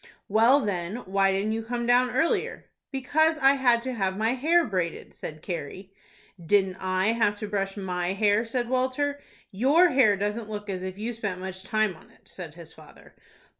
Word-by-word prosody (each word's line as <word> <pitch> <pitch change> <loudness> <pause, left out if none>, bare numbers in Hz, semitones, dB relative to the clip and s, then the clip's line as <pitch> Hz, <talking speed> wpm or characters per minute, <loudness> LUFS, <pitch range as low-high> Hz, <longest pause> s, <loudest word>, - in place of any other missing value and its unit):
"Well, 230 +7 +4
then, 185 -3 -3
why 195 0 +2
didn't 195 +3 -1
you 225 +1 -2
come 235 +1 -3
down 245 +1 +4
earlier?" 265 +7 0 0.3
"Because 315 +4 +1
I 270 -2 +5
had 245 -4 +2
to 260 0 -3
have 190 -4 -1
my 220 +3 +1
hair 325 +6 +3
braided," 180 - -3
said 155 0 -8
Carrie. 185 +2 -6 0.5
"Didn't 190 +1 +2
I 185 +2 0
have 225 -2 +1
to 210 - -5
brush 195 -1 -2
my 180 -2 -2
hair?" 205 +2 +2
said 240 +1 -2
Walter. 260 +3 -1 0.3
"Your 280 - +4
hair 245 -8 +4
doesn't 210 +2 -3
look 210 -1 -5
as 185 -1 -4
if 185 0 -6
you 220 +3 -3
had 240 - -5
spent 205 -5 -3
much 190 0 -6
time 215 -1 0
on - - -19
it," - - -25
said 165 -5 -9
his 165 -2 -10
father. 155 -2 -17
210 Hz, 190 wpm, -26 LUFS, 190-250 Hz, 0.5 s, I